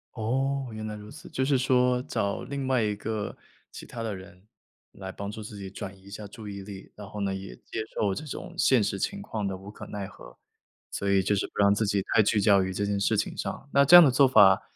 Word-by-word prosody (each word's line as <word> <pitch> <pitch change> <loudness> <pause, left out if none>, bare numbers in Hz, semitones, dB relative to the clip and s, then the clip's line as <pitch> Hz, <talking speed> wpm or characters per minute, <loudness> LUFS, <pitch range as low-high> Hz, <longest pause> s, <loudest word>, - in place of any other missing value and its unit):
哦， 135 +4 -1
原 110 0 -6
来 105 0 -5
如 105 0 -10
此， - - -12
就 130 - -1
是 135 0 +3
说 125 -1 +2
找 100 -5 -2
另 140 -1 -4
外 130 -2 +2
一 105 -1 0
个 105 0 -4 0.4
其 - - -9
他 115 - -7
的 110 -3 -3
人 95 -1 -13 0.5
来 95 -1 -8
帮 100 +1 -6
助 110 +1 -8
自 105 0 -9
己 95 -1 -7
转 95 0 -7
移 95 - -22
一 100 - -14
下 105 0 -7
注 110 +1 -10
意 100 -1 -6
力， 95 -1 -10
然 105 -1 -9
后 105 - -7
呢 100 -1 0
也 95 0 -7
接 - - -7 0.2
受 100 -2 +1
这 95 - -5
种 145 - -7
现 125 -5 +4
实 100 0 -2
情 200 - -2
况 110 - -3
的 95 -1 -3
无 95 +2 -10
可 - - -10
奈 100 -1 -5
何。 - - -14 0.5
所 100 - -2
以 100 -1 +3
就 105 - +1
是 100 - -1
不 - - -27
让 100 0 +5
自 110 +2 0
己 100 -1 +1
太 110 - +6
聚 105 0 +2
焦 100 -2 +5
于 95 - -2
这 100 +2 -1
件 100 0 -1
事 105 +2 +1
情 105 - -1
上， 135 - -5
那 140 - +6
这 150 +6 +8
样 175 -2 +11
的 135 - +4
做 135 +2 +5
法， 95 -7 +6
105 Hz, 280 characters per minute, -27 LUFS, 100-125 Hz, 0.5 s, 样